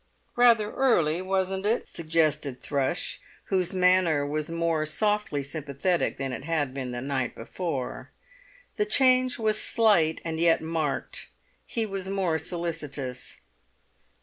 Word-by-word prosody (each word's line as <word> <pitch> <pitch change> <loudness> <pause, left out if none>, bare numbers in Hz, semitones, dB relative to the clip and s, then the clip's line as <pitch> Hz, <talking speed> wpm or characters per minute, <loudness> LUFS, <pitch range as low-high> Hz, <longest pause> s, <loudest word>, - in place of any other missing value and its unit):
"Rather 230 -3 +5
early, 175 -11 +2
wasn't 190 0 -1
it?" 220 +3 0
suggested 155 -5 0
Thrush, 140 +4 0 0.3
whose 185 -2 +2
manner 180 -5 +3
was 150 +2 -2
more 165 -1 0
softly 180 -2 0
sympathetic 150 +5 -1
than 135 -1 -3
it 130 - -5
had 150 -4 -1
been 135 -2 -4
the 120 0 -4
night 135 -2 -2
before. 135 +1 -4 0.7
The 420 - +2
change 255 -8 +4
was 215 -2 0
slight, 195 -9 +3
and 160 -1 -3
yet 165 0 +4
marked. 160 -3 -3 0.4
He 230 -1 -1
was 195 -2 -4
more 185 -5 0
solicitous. 150 -7 -4
165 Hz, 125 wpm, -27 LUFS, 145-195 Hz, 0.7 s, Rather